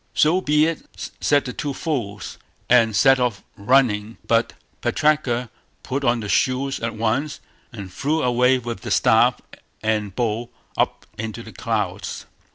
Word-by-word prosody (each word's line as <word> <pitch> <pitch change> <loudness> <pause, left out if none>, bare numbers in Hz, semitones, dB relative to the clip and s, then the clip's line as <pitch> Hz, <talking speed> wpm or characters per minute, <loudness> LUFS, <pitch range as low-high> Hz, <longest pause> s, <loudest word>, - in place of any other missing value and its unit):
"So 170 +5 +3
be 150 -2 +3
it", 165 -1 -5
said 145 -1 +3
the 125 - -5
two 145 -2 -4
fools, 105 -11 -4 0.3
and 115 -3 +4
set 135 +5 +5
off 120 -6 -1
running, 110 -1 +2
but 115 0 +2 0.3
Putraka 130 -6 +1 0.3
put 135 +2 -3
on 120 -2 +2
the 105 - -5
shoes 130 +5 +1
at 115 -1 -3
once, 115 +7 -1 0.3
and 100 -5 -9
flew 155 +3 0
away 125 +1 +3
with 120 -4 -6
the - - -6
staff - - +4 0.4
and 105 -3 -1
bowl 115 0 -1 0.3
up - - -1
into 110 -1 -5
the - - -12
clouds". - - -3
120 Hz, 150 wpm, -22 LUFS, 110-140 Hz, 0.4 s, set